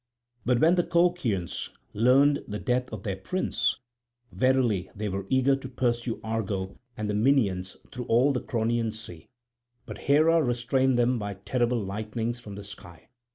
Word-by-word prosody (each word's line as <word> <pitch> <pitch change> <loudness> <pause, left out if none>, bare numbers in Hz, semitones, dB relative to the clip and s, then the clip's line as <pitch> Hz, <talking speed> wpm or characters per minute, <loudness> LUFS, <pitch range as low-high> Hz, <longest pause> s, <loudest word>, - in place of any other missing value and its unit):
But 125 -1 +3
when 160 +3 +5
the 175 -1 +3
Colchians 170 - 0 0.2
learnt 135 +6 +3
the 105 - -3
death 125 +2 -1
of 105 -4 -7
their 95 -2 -3
prince, 185 - 0 0.5
verily 130 -7 +1
they 105 +1 -3
were 95 0 -4
eager 130 +1 +3
to 135 -1 -7
pursue 120 -2 -1
Argo 100 -4 -3 0.2
and 110 -1 -2
the 105 - -1
Minyans 105 -6 +2 0.2
through 125 -2 -5
all 125 +5 +3
the 125 - -1
Cronian 115 -1 0
sea. 105 -7 -10 0.6
But - - -8
Hera 160 +3 +5
restrained 125 0 +1
them 120 0 +2
by 105 -1 -4
terrible 120 +4 0
lightnings 110 +4 -3
from 105 -4 -9
the 100 - -8
sky. 90 -5 -12
120 Hz, 155 wpm, -27 LUFS, 105-130 Hz, 0.6 s, when